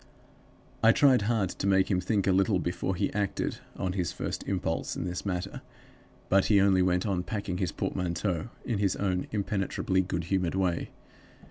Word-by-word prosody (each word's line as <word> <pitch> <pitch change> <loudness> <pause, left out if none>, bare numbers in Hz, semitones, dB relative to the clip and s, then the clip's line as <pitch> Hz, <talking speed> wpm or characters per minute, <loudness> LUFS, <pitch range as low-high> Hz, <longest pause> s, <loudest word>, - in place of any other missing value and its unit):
"I 115 0 +7
tried 130 -4 +5
hard 110 -6 +1
to - - -3
make 95 +1 +3
him 90 -1 +2
think 100 +1 0
a 95 - +3
little 95 +2 +3
before 90 +2 -2
he - - -1
acted 100 -1 -1 0.2
on 90 -1 -2
his 90 -4 -1
first - - -4
impulse 90 -4 -1
in - - -3
this 90 +3 -4
matter; 90 +1 -3 0.7
but 95 0 +4
he 105 -2 +5
only 95 -1 +4
went 90 +1 +2
on 95 -4 0
packing 90 -1 -4
his 90 -4 0
portmanteau 90 +1 -2 0.2
in 115 -5 -1
his 100 -2 +1
own 90 -2 -1
impenetrably 95 -2 0
good 90 -2 -3
humored 90 0 0
way. 90 -3 0
95 Hz, 175 wpm, -29 LUFS, 90-100 Hz, 0.7 s, I